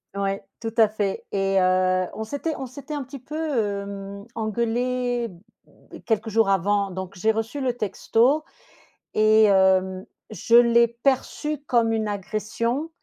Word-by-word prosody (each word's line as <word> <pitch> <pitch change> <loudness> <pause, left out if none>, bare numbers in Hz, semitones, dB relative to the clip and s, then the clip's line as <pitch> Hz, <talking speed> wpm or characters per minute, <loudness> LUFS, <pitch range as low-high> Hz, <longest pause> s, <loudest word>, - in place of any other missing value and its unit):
Ouais, 195 0 -2 0.2
tout 225 -1 -3
à 225 -1 +7
fait 205 -2 -3
et 195 -1 +1
heu, 185 0 +2
on 220 - -4
s'était 285 +8 -3
on 265 - -5
s'était 280 +4 -9
un 295 - -2
petit 265 +2 -9
peu, 270 +4 -9
hem, 200 -9 -3
engueulés, 235 +2 -1 0.4
mmh, - - -16
quelques 225 0 0
jours 220 -1 +2
avant, 200 +1 +1
donc 190 +1 -6
j'ai 215 +5 +2
reçu 225 +6 -3
le 255 -2 0
texto 245 +6 +1 0.7
et 215 0 +5
hem, 190 -2 +3 0.3
je 230 +2 +1
l'ai 235 0 +6
perçu 270 +5 -1
comme 235 -2 +2
une 220 -1 -1
agression 215 - -2
220 Hz, 145 wpm, -24 LUFS, 200-245 Hz, 0.7 s, à